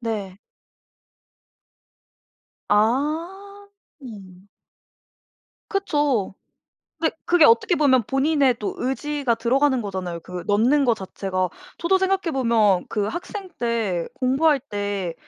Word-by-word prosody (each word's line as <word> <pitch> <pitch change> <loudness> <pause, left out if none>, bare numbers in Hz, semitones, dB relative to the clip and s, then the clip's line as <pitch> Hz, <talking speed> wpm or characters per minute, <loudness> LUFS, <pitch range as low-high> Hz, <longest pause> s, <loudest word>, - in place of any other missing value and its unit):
네. 210 -5 -4 2.3
아. 325 - -1 0.3
음. 195 -6 -12 1.2
그쵸. 290 - 0 0.7
근데 320 0 0
그게 345 -3 +5
어떻게 450 -5 +4
보면 275 -5 +4
본인의 270 +1 +2
또 210 - -3
의지가 270 -1 -1
들어가는 260 +3 +1
거잖아요, 185 -4 -4
그 180 +1 -7
넣는 240 +8 +3
것 240 -4 +3
자체가. 185 -1 -3 0.3
저도 360 +3 +2
생각해 380 -2 0
보면 225 -8 +2
그 210 -2 -1
학생 370 - -6
때 225 -8 -1
공부할 275 +3 +2
때 205 -7 -4
255 Hz, 200 characters per minute, -23 LUFS, 205-310 Hz, 2.3 s, 그게